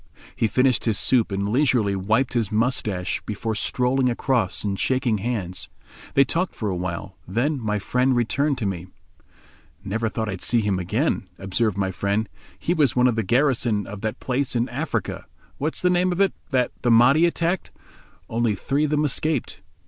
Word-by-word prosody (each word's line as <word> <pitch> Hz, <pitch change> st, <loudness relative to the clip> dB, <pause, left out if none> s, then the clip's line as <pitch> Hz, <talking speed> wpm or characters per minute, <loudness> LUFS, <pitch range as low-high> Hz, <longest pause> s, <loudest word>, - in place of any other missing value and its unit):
He 115 Hz, -, +1 dB
finished 125 Hz, +4 st, +2 dB
his 110 Hz, -3 st, +1 dB
soup 120 Hz, -5 st, +2 dB
and 100 Hz, +1 st, -1 dB
leisurely 120 Hz, -5 st, +2 dB
wiped 110 Hz, +8 st, +1 dB
his 115 Hz, -5 st, 0 dB
moustache 110 Hz, -5 st, 0 dB
before 110 Hz, +1 st, -3 dB
strolling 125 Hz, +4 st, +1 dB
across 120 Hz, -5 st, 0 dB
and 100 Hz, -2 st, -2 dB
shaking 130 Hz, -5 st, +1 dB
hands. 100 Hz, -5 st, -3 dB, 0.5 s
They 140 Hz, -, +7 dB
talked 170 Hz, +7 st, -1 dB
for 110 Hz, -, -2 dB
a -, -, -2 dB
while. 90 Hz, +2 st, -5 dB
Then 130 Hz, -, 0 dB
my 105 Hz, -1 st, 0 dB
friend 125 Hz, +6 st, +1 dB
returned 135 Hz, +4 st, +1 dB
to 115 Hz, -, -3 dB
me. 90 Hz, -2 st, -3 dB, 1.0 s
"Never 115 Hz, +3 st, -1 dB
thought 110 Hz, +2 st, -2 dB
to 95 Hz, -4 st, -4 dB
see 120 Hz, -1 st, +2 dB
him 100 Hz, -3 st, 0 dB
again," 100 Hz, -, -1 dB
observed 100 Hz, +2 st, -1 dB
my 95 Hz, -1 st, 0 dB
friend, 100 Hz, +4 st, -1 dB, 0.3 s
"he 175 Hz, -, 0 dB
was 150 Hz, -8 st, +2 dB
one 125 Hz, 0 st, +4 dB
of 125 Hz, -3 st, +3 dB
the 115 Hz, -, +1 dB
garrison 120 Hz, -2 st, +1 dB
of 100 Hz, -1 st, -8 dB
that 110 Hz, -1 st, -3 dB
place 130 Hz, 0 st, -1 dB
in 120 Hz, +1 st, +1 dB
Africa—what's 155 Hz, +2 st, -4 dB
the 180 Hz, -, +4 dB
name 180 Hz, +1 st, +2 dB
of 175 Hz, -, -2 dB
it?—that 140 Hz, -9 st, +1 dB
the 120 Hz, -, +1 dB
Mahdi 125 Hz, +8 st, +6 dB
attacked. 170 Hz, +1 st, -1 dB, 0.6 s
Only 115 Hz, -2 st, 0 dB
three 140 Hz, +10 st, 0 dB
of -, -, -2 dB
them 150 Hz, 0 st, +2 dB
escaped. 145 Hz, -6 st, -1 dB
120 Hz, 175 wpm, -23 LUFS, 100-135 Hz, 1.0 s, They